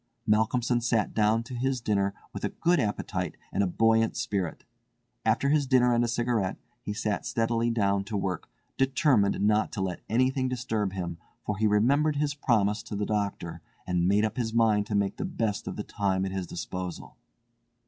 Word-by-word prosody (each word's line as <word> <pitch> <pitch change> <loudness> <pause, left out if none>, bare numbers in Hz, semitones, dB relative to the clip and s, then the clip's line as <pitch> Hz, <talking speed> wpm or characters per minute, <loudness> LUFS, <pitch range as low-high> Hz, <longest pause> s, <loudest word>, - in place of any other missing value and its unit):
Malcolmson 115 +3 +2
sat 115 -3 +1
down 110 +1 +2
to 125 +2 -9
his 130 +1 0
dinner 100 -3 0 0.2
with - - -6
a - - +1
good 175 +1 +1
appetite 105 -5 -2 0.2
and - - +1
a 100 - +2
buoyant 115 +4 +2
spirit. 100 -9 -2 0.6
After 140 - +2
his 145 -2 +2
dinner 125 -2 +4
and 120 0 +3
a - - +1
cigarette 115 -4 0 0.2
he 105 - -4
sat 105 -1 -2
steadily 115 0 0
down 100 -4 +1
to 105 0 -3
work, 95 -3 -3 0.3
determined 130 -6 +3
not 105 +1 +2
to 110 - -4
let 95 -2 -3
anything 130 +3 +2
disturb 110 -6 -2
him, 85 -3 -4 0.3
for 105 - -1
he 110 - +3
remembered 140 +9 +3
his 145 0 0
promise 110 -7 +1
to 115 -2 -7
the 105 +1 -1
doctor, 100 -5 -2 0.2
and 90 -1 +1
made 105 +3 +3
up 110 +2 -3
his 115 -2 -2
mind 110 -3 +3
to 105 - -2
make 100 -1 0
the - - -3
best 115 - -2
of - - -4
the 105 - -4
time 95 -3 -1
at 95 - -3
his 95 -2 -3
disposal. 90 +1 -6
110 Hz, 190 wpm, -28 LUFS, 100-120 Hz, 0.6 s, dinner